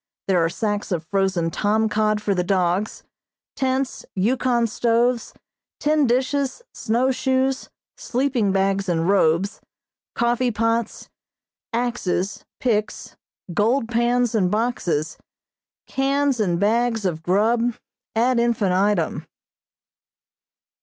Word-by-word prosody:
There 180 -3 +3
are 165 - +1
sacks 205 +3 -2
of 170 -3 -2
frozen 190 -3 0
tom 215 +4 +1
cod 215 0 0
for 205 - +1
the 180 -1 0
dogs, 185 +2 0 0.5
tents, 265 0 -1
Yukon 240 +4 +1
stoves, 235 +1 +1 0.5
tin 300 -2 +2
dishes, 265 - 0
snow 240 +4 +1
shoes, 260 0 0 0.3
sleeping 250 -5 0
bags 195 0 0
and 165 -1 0
robes, 190 -1 +2 0.5
coffee 240 +1 +1
pots, 230 0 -1 0.6
axes, 230 -5 -2 0.2
picks, 215 -4 -1 0.4
gold 225 +5 +1
pans 240 0 +1
and 195 -5 +2
boxes, 195 -8 -1 0.7
cans 275 -1 0
and 175 -5 +1
bags 225 +1 +1
of 165 -4 -1
grub, 225 +7 +1 0.4
ad 240 +2 +2
infinitum. 205 -6 +1
220 Hz, 105 wpm, -22 LUFS, 195-245 Hz, 0.7 s, There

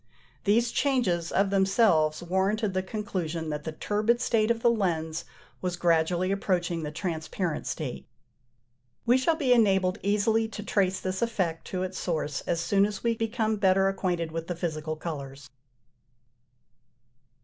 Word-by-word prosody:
These 230 +3 +3
changes 200 - +1
of 195 0 +2
themselves 190 -6 +3
warranted 195 +4 0
the 185 - +1
conclusion 180 -6 -3
that 150 0 -5
the 160 - -3
turbid 210 +8 0
state 220 -2 +2
of 230 -1 0
the 235 - +6
lens 165 -6 -1 0.4
was 180 -1 -1
gradually 175 +2 +2
approaching 180 -4 0
the 150 - -3
transparent 165 +1 -3
state. 140 -6 -4 1.0
We 245 +2 +4
shall 320 +5 +2
be 275 -6 +3
enabled 190 -5 +3
easily 215 +3 +2
to 210 -1 -7
trace 190 -2 +1
this 185 0 -3
effect 185 -8 -1
to 185 -1 -2
its 185 0 -4
source 155 -4 -2
as 170 - 0
soon 195 +4 +3
as 205 -2 -7
we 235 -1 +2
become 220 -1 -1
better 195 -1 +3
acquainted 175 -4 -2
with 165 0 -4
the 175 - -3
physical 155 -2 -3
colours. 140 -4 -7
185 Hz, 150 wpm, -27 LUFS, 165-215 Hz, 1.0 s, the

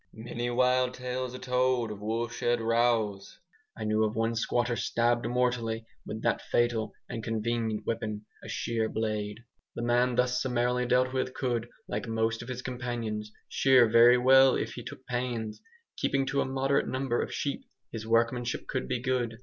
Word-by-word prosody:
Many 120 +2 -4
wild 125 +1 +2
tales 125 0 -4
are - - -5
told 125 -2 +1
of 105 -1 -8
woolshed 115 +2 -1
rows. 115 -3 +1 0.4
I - - -5
knew 110 0 +2
of 110 0 0
one 115 +1 +1
squatter 120 +1 0
stabbed 120 +1 +1
mortally 120 -2 0 0.2
with 110 +1 -5
that - - +1
fatal 115 -3 0
and 115 - -5
convenient 115 0 -1
weapon, 110 -2 -3 0.2
a - - -8
shear 115 -1 -1
blade. 110 0 -2 0.3
The 120 - -3
man 120 +1 +2
thus 125 0 +2
summarily 125 -1 0
dealt 130 +1 +2
with 130 -1 -1
could, 120 -3 -1 0.2
like - - -3
most 115 0 0
of 115 - -9
his 125 0 -5
companions, 120 -4 -4 0.2
shear 130 -3 +5
very 115 +2 +7
well 130 +1 +6
if - - -2
he 120 - -7
took 125 +2 -10
pains. 120 -3 -3 0.4
Keeping 135 -1 +1
to 135 +1 0
a - - 0
moderate 135 +1 +1
number 130 -2 0
of - - -4
sheep, 140 - -2 0.3
his 110 -1 -6
workmanship 115 +1 +1
could 130 - -2
be 125 -2 -1
good. 120 -2 -1
120 Hz, 170 wpm, -29 LUFS, 115-125 Hz, 0.4 s, very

